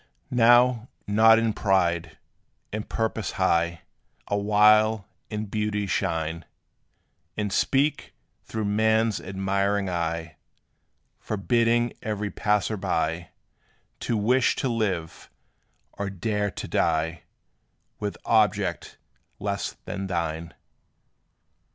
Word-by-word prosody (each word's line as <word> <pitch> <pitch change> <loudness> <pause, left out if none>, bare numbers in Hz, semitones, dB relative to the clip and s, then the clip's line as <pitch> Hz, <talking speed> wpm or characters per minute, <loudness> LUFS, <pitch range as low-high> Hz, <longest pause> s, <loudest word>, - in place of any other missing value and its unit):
Now, 120 0 +5 0.2
not 110 +2 +6
in 115 -1 +1
pride 85 -6 0 0.6
in 110 0 -3
purpose 110 -1 -2
high, 85 -2 +1 0.5
Awhile 105 +1 +4 0.2
in 105 0 -3
beauty 105 0 -2
shine; 80 -3 -2 0.9
And 105 -2 -2
speak, 140 +3 +1 0.3
through 110 -1 -4
man's 110 +1 +2
admiring 100 +1 -1
eye, 85 -1 -3 0.8
Forbidding 115 +3 +1
every 105 -1 -3
passer 105 0 0
by 85 -3 -1 0.7
To 115 - -1
wish 125 +5 +2
to 135 - -1
live, 95 -8 -2 0.6
or 100 -1 -4
dare 105 +2 -1
to - - -7
die 80 0 0 0.8
With 105 -1 -3
object 105 -3 +1 0.4
less 100 0 -3
than 95 0 -4
thine. 85 -2 -3
105 Hz, 95 wpm, -25 LUFS, 90-110 Hz, 0.9 s, not